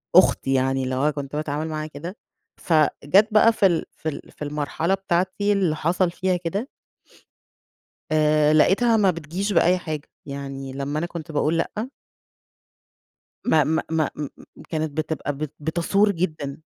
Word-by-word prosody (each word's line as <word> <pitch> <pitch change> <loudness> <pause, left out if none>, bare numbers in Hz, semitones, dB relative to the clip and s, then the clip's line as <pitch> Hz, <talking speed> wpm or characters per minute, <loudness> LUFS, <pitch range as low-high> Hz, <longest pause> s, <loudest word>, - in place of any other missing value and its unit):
أختي 135 - +5
يعني 135 0 +1
اللي 130 0 -2
هو 145 +4 +2
كُنت 140 -1 -6
باتعامل 150 +1 -2
معاها 155 -1 -4
كده. 165 +7 -8 0.4
فجات 170 +6 +3
بقى 220 +2 +6
في 205 - +2
ال 175 -4 +2
في 160 - -4
ال 145 - -8
في - - -27
المرحلة 150 +4 -1
بتاعتي 195 +2 0
اللي 185 -6 +1
حصل 175 +3 +1
فيها 185 +1 0
كده 190 +8 -3 1.4
آآ 155 -1 +4
لقيتها 225 +9 +4
ما 200 -3 +4
بتجيش 175 +5 -3
بأي 180 +1 +4
حاجة، 155 -4 -5 0.2
يعني 135 -1 -6
لمّا 140 +2 -2
أنا 170 - -2
كنت 170 -2 -7
باقول 155 +2 +1
لأ 215 +8 -2 1.6
ما 160 -10 +4
ما 160 +1 0
ما 160 -2 +1
م 150 - -4 0.4
كانت 155 -2 -3
بتبقى 155 -2 -2
بت 150 -1 -4
بتثور 170 +7 +2
جدًا، 155 -6 -3
160 Hz, 150 wpm, -23 LUFS, 150-185 Hz, 1.6 s, بقى